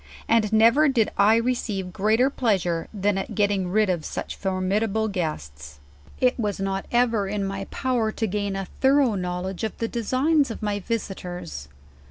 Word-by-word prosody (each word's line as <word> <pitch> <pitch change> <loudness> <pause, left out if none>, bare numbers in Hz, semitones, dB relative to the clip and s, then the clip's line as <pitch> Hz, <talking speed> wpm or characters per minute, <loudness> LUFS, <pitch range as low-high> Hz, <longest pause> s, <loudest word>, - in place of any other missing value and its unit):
And 225 -2 +3
nerer 235 +7 +5
did 230 -5 +1
I 210 +2 +5
receive 225 -6 -1
greater 220 +8 +2
pleasure 185 -10 0
than 205 -1 0
at - - -5
getting 205 -3 +1
rid 215 +3 +3
of 175 -4 -1
such - - -5
formidable 200 +3 0
guests. 75 - -5 0.4
"It 255 0 +2
was 210 -4 -1
not 195 0 -2
ever 235 -4 +2
in 200 0 -2
my 195 0 -4
power 240 -3 -1
to 225 - -1
gain 205 -1 -2
a 195 0 -3
thorough 270 +2 +2
knowl 180 -1 -3
edge 190 +1 -5
of 220 - -3
the 230 - -1
designs 260 +6 +1
of 225 - -7
my 205 -1 -1
visitors. 180 - -5
205 Hz, 170 wpm, -24 LUFS, 190-230 Hz, 0.4 s, nerer